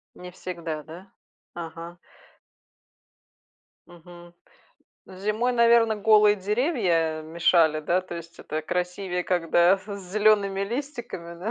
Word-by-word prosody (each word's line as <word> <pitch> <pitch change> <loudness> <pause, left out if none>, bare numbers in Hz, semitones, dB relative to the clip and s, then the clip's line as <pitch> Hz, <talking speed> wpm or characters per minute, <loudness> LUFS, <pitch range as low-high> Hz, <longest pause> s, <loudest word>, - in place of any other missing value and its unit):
Не 180 0 -10
всегда, 170 -4 -6
да? 175 +6 -13 0.4
Ага. 170 +1 -8 1.9
Мгм. 175 0 -15 0.7
Зимой, 215 +6 -2
наверно, 235 -2 +4
голые 210 0 +5
деревья 190 - 0
мешали, 160 -1 +2
да, 175 +4 +1
то 185 -1 -9
есть 170 0 -10
это 155 +1 -5
красивее, 180 +1 -3
когда 175 +1 +3
с - - -19 0.3
зелеными 205 -2 +3
листиками, 235 - -5
да? 210 +6 -4
180 Hz, 105 wpm, -25 LUFS, 170-210 Hz, 1.9 s, голые